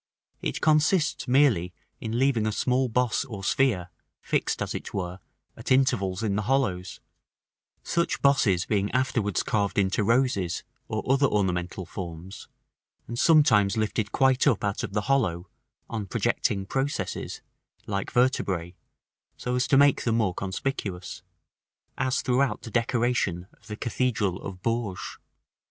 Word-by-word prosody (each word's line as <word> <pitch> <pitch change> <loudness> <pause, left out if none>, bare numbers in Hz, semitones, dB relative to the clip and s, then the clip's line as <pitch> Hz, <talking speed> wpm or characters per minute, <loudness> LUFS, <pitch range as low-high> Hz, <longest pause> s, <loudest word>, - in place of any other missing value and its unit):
It - - -3
consists 155 0 +2
merely 125 -10 +3 0.3
in 110 +1 -3
leaving 125 -4 +2
a - - 0
small 125 +4 +1
boss 125 +1 +1
or 110 -8 -8
sphere, 100 -5 +1 0.3
fixed, - - -1
as - - -4
it - - -6
were, 90 -1 -3 0.4
at - - -7
intervals 105 -7 +2
in 100 -3 0
the 105 - 0
hollows; 105 -7 -1 0.8
such 170 0 0
bosses 115 -10 +3
being 100 -2 0
afterwards 120 -7 0
carved 100 -3 -1
into 100 +1 +2
roses, 115 -6 +1 0.2
or 110 0 -3
other 135 +2 +4
ornamental 90 -4 -1
forms, 85 +1 -8 0.6
and 120 +1 -4
sometimes 110 - +5
lifted 110 0 -1
quite 130 +1 +3
up 120 -8 +2
out 100 -1 -1
of 110 -5 -5
the 105 - +1
hollow, 100 -9 0 0.4
on 110 -4 -4
projecting 95 +1 0
processes, 135 +7 -3 0.4
like 100 -1 -3
vertebræ, 95 -9 +1 0.6
so 125 - -3
as 125 0 +1
to 135 - +4
make 140 0 +5
them 115 -2 +1
more 105 -6 +1
conspicuous, 95 -2 -4 0.8
as 130 0 0
throughout 125 -3 +1
the 115 - -8
decoration 115 -6 0
of 105 - -23
the 105 -1 -6
cathedral 110 -6 -1
of 90 -2 -8
Bourges. 115 -5 -3
110 Hz, 140 wpm, -26 LUFS, 95-130 Hz, 0.8 s, sometimes